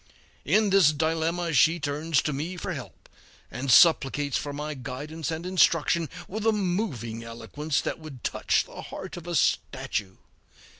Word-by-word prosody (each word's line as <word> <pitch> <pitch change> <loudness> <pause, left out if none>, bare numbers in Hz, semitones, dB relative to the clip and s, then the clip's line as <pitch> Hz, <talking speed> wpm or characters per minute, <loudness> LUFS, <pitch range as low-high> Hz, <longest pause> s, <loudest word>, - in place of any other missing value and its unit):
In 215 -2 +3
this 190 -6 +6
dilemma 165 +2 -1
she 160 +5 +4
turns 150 0 0
to 150 - -1
me 160 +7 -4
for - - -4
help, - - -10 0.4
and 130 +4 -4
supplicates 145 -1 +5
for 145 - -2
my 150 +1 -4
guidance 145 +4 -6
and 165 +1 -4
instruction 170 -3 +2 0.2
with 210 +3 -5
a - - +6
moving 175 - -2
eloquence 140 +6 -3
that - - -4
would 150 -6 -11
touch - - +1
the - - -10
heart - - -8
of 175 -1 -9
a 175 - -2
statue. 100 -7 0
155 Hz, 155 wpm, -26 LUFS, 140-175 Hz, 0.4 s, this